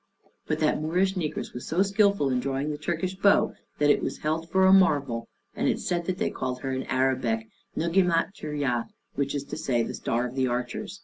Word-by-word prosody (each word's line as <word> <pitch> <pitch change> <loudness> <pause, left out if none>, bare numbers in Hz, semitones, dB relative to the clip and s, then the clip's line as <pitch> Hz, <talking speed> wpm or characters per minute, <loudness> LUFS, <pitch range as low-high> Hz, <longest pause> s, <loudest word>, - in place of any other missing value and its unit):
But - - 0
that - - +2
Moorish 180 +5 +1
negress 170 -6 -3
was 125 - -7
so 175 +5 +2
skilful 200 -7 +2
in 125 - +1
drawing 135 +3 -2
the 150 - -4
Turkish 175 +4 -2
bow, 200 +1 +4 0.2
that 145 0 +4
it - - +2
was - - -3
held 160 +2 -2
for 190 0 +4
a 190 - +7
marvel; 140 -11 +3 0.3
and - - 0
it - - +4
is - - -6
said 175 -1 0
that 185 0 -2
they - - 0
called 125 -1 -4
her 135 - -3
in 130 0 -2
Arabic 130 -4 0 0.3
Nugueymat 170 +2 +2
Turya, 145 - -2 0.3
which 140 0 -1
is 140 - -2
to - - -7
say, 120 -3 +1
the - - -4
Star 120 +2 -1
of 125 - -5
the 130 -1 +1
Archers. 125 0 -3
145 Hz, 215 wpm, -27 LUFS, 130-180 Hz, 0.3 s, a